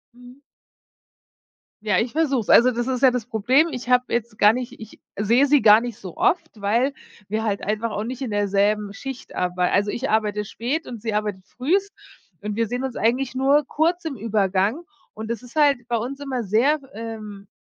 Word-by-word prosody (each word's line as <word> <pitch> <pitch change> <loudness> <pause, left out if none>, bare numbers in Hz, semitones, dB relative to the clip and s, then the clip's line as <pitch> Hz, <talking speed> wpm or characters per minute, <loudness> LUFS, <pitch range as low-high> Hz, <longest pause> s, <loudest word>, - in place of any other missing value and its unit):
Mhm. 250 +2 -15 1.4
Ja, 210 -4 +2
ich 230 +2 -2
versuch's. 280 -8 0
Also 250 +2 +7
das 240 +1 -3
ist 255 -1 -1
ja 265 - +6
das 245 -3 -3
Problem. 255 +8 +2
Ich 250 -2 -6
hab 250 0 +3
jetzt 235 -2 -2
gar 210 +2 +6
nicht 250 -2 -6
ich 220 -1 -12 0.2
sehe 235 +7 +3
sie 290 -1 +4
gar 215 +1 +7
nicht 240 -3 -6
so 185 -3 -9
oft, 335 -2 +1
weil 235 +7 +1 0.3
wir 215 +2 -2
halt 205 -2 -1
einfach 215 +2 -2
auch 210 - -3
nicht 255 +3 -6
in 250 -5 -3
derselben 205 0 +1
Schicht 270 +3 -8
arbeit 180 0 0
also 205 +1 +2
ich 265 +3 -3
arbeite 210 -1 0
spät 265 +11 -3
und 235 -4 -8
sie 225 -2 -3
arbeitet 210 -3 -2
früh 380 +10 -1 0.5
und 210 0 -4
wir 230 0 0
sehen 245 +3 -3
uns 265 -2 -4
eigentlich 250 +3 0
nur 275 +2 +3
kurz 335 +3 0
im 305 -4 -3
Übergang 205 - 0 0.3
und 220 +1 -7
es 235 +2 -5
ist 245 - -14
halt 280 -6 +3
bei 240 - 0
uns 255 +5 -5
immer 265 -4 -3
sehr, 245 +10 +2
ähm 215 -3 -8
235 Hz, 200 wpm, -23 LUFS, 210-265 Hz, 1.4 s, Also